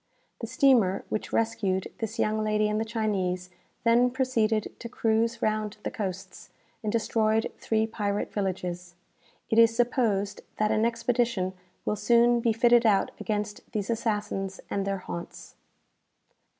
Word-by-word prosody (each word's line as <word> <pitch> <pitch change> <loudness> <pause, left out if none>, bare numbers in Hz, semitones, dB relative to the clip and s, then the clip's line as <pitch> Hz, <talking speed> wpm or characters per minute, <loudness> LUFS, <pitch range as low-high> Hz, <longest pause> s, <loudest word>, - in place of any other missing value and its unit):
"'The - - -4
steamer 230 -9 +3
which 215 - -3
rescued 205 -5 0
this 225 -3 -4
young 215 0 +1
lady 215 0 +2
and 210 0 0
the - - +1
Chinese, 195 -5 -2 0.3
then 235 +2 +4
proceeded 230 -4 0
to 235 - -7
cruise 225 0 0
round 215 -1 -1
the - - -3
coasts, 190 -3 -6 0.3
and 215 - -2
destroyed 220 0 +1
three 220 0 +1
pirate 205 -2 -2
villages. 180 -3 -3 0.6
It 225 - +4
is 230 0 +6
supposed 225 -5 +1 0.2
that 215 0 +1
an 220 +1 +2
expedition 230 -4 0 0.3
will - - 0
soon 235 +2 +4
be 230 0 +2
fitted 240 +1 +4
out 205 -4 +3
against 210 -1 -3
these 210 0 -1
assassins 205 -4 -2
and 200 0 -1
their 195 0 0
haunts.'" 175 -2 -8
215 Hz, 140 wpm, -27 LUFS, 200-230 Hz, 0.6 s, is